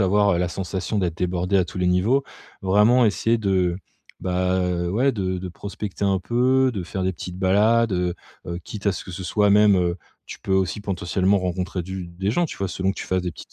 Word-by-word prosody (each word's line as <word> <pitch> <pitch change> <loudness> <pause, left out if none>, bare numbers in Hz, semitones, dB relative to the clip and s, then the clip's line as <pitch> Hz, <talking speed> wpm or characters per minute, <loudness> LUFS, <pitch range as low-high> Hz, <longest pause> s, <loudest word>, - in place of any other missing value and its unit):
avoir 100 -1 +3
la 90 0 0
sensation 95 +3 -3
d'être 90 -3 -1
débordé 90 +2 0
à 95 - +3
tous - - -11
les 90 - +1
niveaux. 105 +10 +2 0.4
Vraiment 105 +6 +4
essayer 115 +2 +2
de, 95 -4 +1 0.4
bah, 90 0 0
heu, 90 -1 -1
ouais 130 +8 +2
de 95 -3 -2
de 90 0 -5
prospecter 100 +2 -5
un 95 -1 +2
peu, 130 +5 +2
de 95 -4 -3
faire 95 +2 -4
des 95 0 0
petites 90 +2 -8
balades, 105 +4 +3
heu 90 -1 0 0.3
heu, 85 0 -4
quitte 105 -1 -7
à 100 - +4
ce - - -6
que 90 - -9
ce 90 +1 -6
soit 105 +3 +2
même, 105 0 +6
heu, 90 -1 +1 0.3
tu - - -8
peux - - -3
aussi 95 +1 +1
potentiellement 95 0 0
rencontrer 90 0 -2
du 95 0 -6
des 95 +4 -3
gens, 175 +9 +1
tu - - -8
vois, 95 -1 -2
selon 95 +1 -1
que - - -18
tu - - -5
fasses 95 -1 0
des 90 -2 -3
petites - - -13
95 Hz, 225 wpm, -23 LUFS, 90-105 Hz, 0.4 s, même